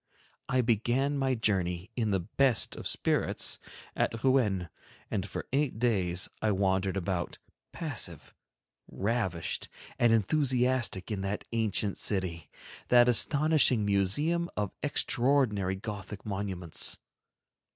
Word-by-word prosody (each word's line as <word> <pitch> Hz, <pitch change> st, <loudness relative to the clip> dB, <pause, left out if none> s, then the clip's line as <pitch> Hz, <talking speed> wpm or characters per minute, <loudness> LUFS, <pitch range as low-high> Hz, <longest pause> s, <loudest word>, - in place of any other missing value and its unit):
I 130 Hz, -, +3 dB
began 120 Hz, +5 st, +1 dB
my 135 Hz, -1 st, +1 dB
journey, 95 Hz, -3 st, 0 dB
in 115 Hz, -3 st, 0 dB
the 95 Hz, -3 st, +1 dB
best 120 Hz, +6 st, +1 dB
of -, -, -5 dB
spirits, -, -, +1 dB, 0.4 s
at 115 Hz, -1 st, -1 dB
Rouen, 110 Hz, -9 st, +2 dB, 0.4 s
and 100 Hz, -2 st, -2 dB
for -, -, -5 dB
eight 140 Hz, -4 st, +1 dB
days 95 Hz, -7 st, +1 dB
I 110 Hz, -, +2 dB
wandered 95 Hz, 0 st, +1 dB
about, 90 Hz, -1 st, -2 dB, 0.3 s
passive, -, -, -4 dB, 0.5 s
ravished, 95 Hz, -6 st, -2 dB, 0.3 s
and 120 Hz, -1 st, +5 dB
enthusiastic, 125 Hz, -2 st, +1 dB
in 100 Hz, -2 st, -2 dB
that 100 Hz, +2 st, -3 dB
ancient 110 Hz, -3 st, 0 dB
city, 90 Hz, -6 st, -1 dB, 0.4 s
that 120 Hz, 0 st, +6 dB
astonishing 140 Hz, -2 st, +4 dB
museum 145 Hz, -, +1 dB
of 105 Hz, -2 st, -1 dB
extraordinary 125 Hz, -9 st, +1 dB
Gothic 100 Hz, -1 st, -7 dB
monuments. 95 Hz, -5 st, -1 dB
105 Hz, 110 wpm, -30 LUFS, 95-125 Hz, 0.5 s, that